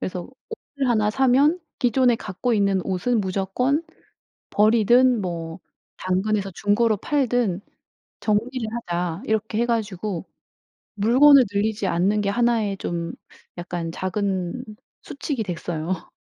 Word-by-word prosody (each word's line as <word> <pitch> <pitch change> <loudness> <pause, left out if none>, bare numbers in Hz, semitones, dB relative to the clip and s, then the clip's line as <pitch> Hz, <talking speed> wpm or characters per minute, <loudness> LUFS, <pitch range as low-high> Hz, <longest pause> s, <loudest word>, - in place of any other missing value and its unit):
그래서 180 -1 -4 0.3
옷을 285 - -4
1 215 -3 +2
사면 270 +7 +3 0.2
기존에 245 0 +3
갖고 220 +4 -3
있는 200 -2 +2
옷은 205 +5 0
무조건 200 - 0 0.7
버리든 235 +3 +4
뭐 170 -2 -5 0.4
당근에서 195 +2 -1
중고로 210 +3 +2
팔든 245 -8 0 0.6
"정리를 225 +3 -1 0.2
하자." 175 +2 -2
이렇게 220 -1 -1
해 235 - +2
가지고 210 -6 -2 0.7
물건을 255 +6 +6
늘리지 205 0 0
않는 190 +5 +1
게 200 - 0
1 235 +2 +2
의 200 -1 -2
좀 170 -2 -4 0.4
약간 175 -1 -4
작은 190 +4 -2 0.4
수칙이 275 -4 -4
됐어요. 175 -1 -4
210 Hz, 240 characters per minute, -23 LUFS, 185-240 Hz, 0.7 s, 물건을